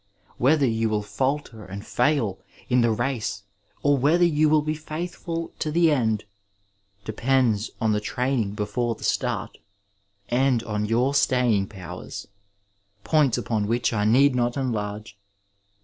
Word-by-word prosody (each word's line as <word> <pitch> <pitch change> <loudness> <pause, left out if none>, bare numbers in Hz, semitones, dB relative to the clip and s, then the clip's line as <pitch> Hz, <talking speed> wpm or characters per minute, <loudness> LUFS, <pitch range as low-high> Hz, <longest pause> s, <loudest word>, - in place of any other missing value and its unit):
Whether 140 +3 +4
you 115 -2 +1
will 105 -1 0
falter 130 0 -2
and 100 +2 -8
fail 120 -7 +1 0.3
in 125 -1 +4
the 115 - +3
race 115 -3 -2 0.4
or 145 -1 +3
whether 165 +7 +4
you 155 -2 +3
will 155 -1 +4
be 155 +1 -1
faithful 165 +2 -5
to 155 - -1
the 165 +1 +3
end 110 -7 +1 0.8
depends 115 -1 +1
on 110 -1 +1
the 105 - +1
training 120 -1 -1
before 115 +3 -1
the - - -13
start, - - -1 0.7
and 125 -1 +2
on 105 -2 -2
your 120 +5 +1
staying 120 -8 +2
powers, 95 -5 -8 0.8
points 150 -6 +3
upon 105 -3 -1
which 120 +2 0
I 105 -2 0
need 130 +6 +5
not 120 +1 0
enlarge. 105 -5 -3
120 Hz, 140 wpm, -24 LUFS, 110-140 Hz, 0.8 s, need